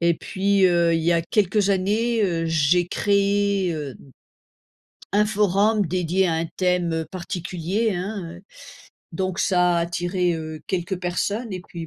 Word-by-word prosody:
Et 170 0 +3
puis 195 +3 +1
heu, 170 -1 +3
il 165 - 0
y 170 +2 +3
a 170 - +2
quelques 200 +2 +1
années, 215 +4 +1
heu, 170 -4 0
j'ai 165 +2 +2
créé, 200 -1 +1
heu, 145 -4 -6 1.2
un 210 +1 +3
forum 210 0 +2
dédié 180 +2 0
à 165 - 0
un 165 - -1
thème 175 -3 0
particulier, 185 +3 -2
hein, 180 -2 -5
heu, - - -15 0.7
donc 185 -1 -3
ça 180 -2 +2
a 170 - +2
attiré, 175 +1 -1
heu, 155 -1 -6
quelques 185 0 -3
personnes 200 +5 -2
et 185 - -4
puis 165 -1 -7
180 Hz, 150 wpm, -23 LUFS, 170-200 Hz, 1.2 s, Et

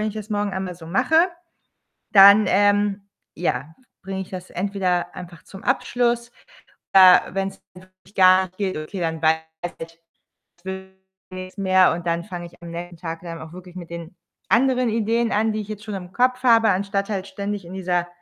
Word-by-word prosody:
wenn 215 - 0
ich 215 - -7
das 215 0 -7
morgen 205 -1 -1
einmal 190 -1 -4
so 165 -1 -13
mache, 320 - +3 0.9
dann, 200 +1 +9
ähm, 205 +1 +2 0.3
ja, 160 -2 -3 0.3
bringe 190 0 -5
ich 185 - -9
das 185 -1 -8
entweder 185 -2 -1
einfach 175 -1 -10
zum 195 - -12
Abschluss. 240 -2 0 0.6
Äh, 185 -1 +9
wenn's 195 0 -3
wirklich 185 +2 -19
gar 185 0 +6
nicht 185 0 -18
geht, 195 -4 -2
okay, 155 +5 -6
dann 160 -1 -2
weiß 160 0 +3 0.4
ich, 165 0 -9 0.6
das 175 - -32
wird 190 0 -6 0.4
nix 185 +1 -8
mehr. 190 -2 +4
Und 175 0 -7
dann 170 0 0
fange 175 -4 -7
ich 170 - -15
am 170 - -8
nächsten 170 0 -7
Tag 165 -1 -6
dann 165 -1 -7
auch 160 +1 -10
wirklich 180 0 -12
mit 175 -2 -8
den 170 +1 -8 0.4
anderen 250 -1 +3
Ideen 230 +1 0
an, 220 +1 +1
die 215 - -3
ich 205 - -13
jetzt 215 -1 -7
schon 215 -2 -6
im 180 -1 -7
Kopf 250 +2 +1
habe, 230 -3 +5
anstatt 200 +1 -1
halt 195 -3 -3
ständig 200 0 -5
in 170 - -11
dieser 180 -2 -1
190 Hz, 190 wpm, -22 LUFS, 175-205 Hz, 0.9 s, dann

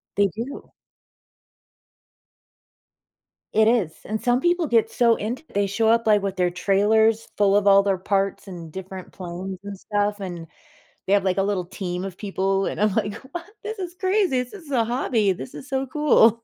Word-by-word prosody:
They 200 0 +4
do. 230 +9 -7 2.8
It 220 0 +4
is. 220 -9 +2
And 215 +1 -3
some 245 +2 +2
people 350 0 +2
get 230 -3 +3
so 235 -2 +4
into 235 +9 -4
it. - - -22
They 200 0 +2
show 220 +3 0
up, 230 0 +3
like, 210 -1 +5
with 195 -1 -3
their 180 -1 +2
trailers 215 +4 +2
full 200 -1 +4
of 205 0 +3
all 200 0 +7
their 195 -1 +1
parts 195 +1 -1
and 170 -4 -8
different 190 +1 -8
planes 185 +1 -6
and 200 -1 -7
stuff, 205 0 -1
and 175 -4 -6 0.6
they 195 - 0
have, 200 -1 +4
like, 185 0 +1
a - - +3
little 195 -2 -1
team 180 0 -4
of 190 -2 -6
people. 195 -1 -1
And - - -3
I'm 210 -1 +3
like, 210 -2 0 0.2
"What?” 345 -1 -5 0.2
“This 440 +1 -5
is 355 -2 -5
crazy. 370 -8 +1
This 250 - -12
is 335 -8 -11
a 245 -4 +2
hobby. 230 -4 +1
This 185 - -8
is 275 - -9
so 270 -1 -1
cool." 250 -6 +4
205 Hz, 190 wpm, -23 LUFS, 195-240 Hz, 2.8 s, all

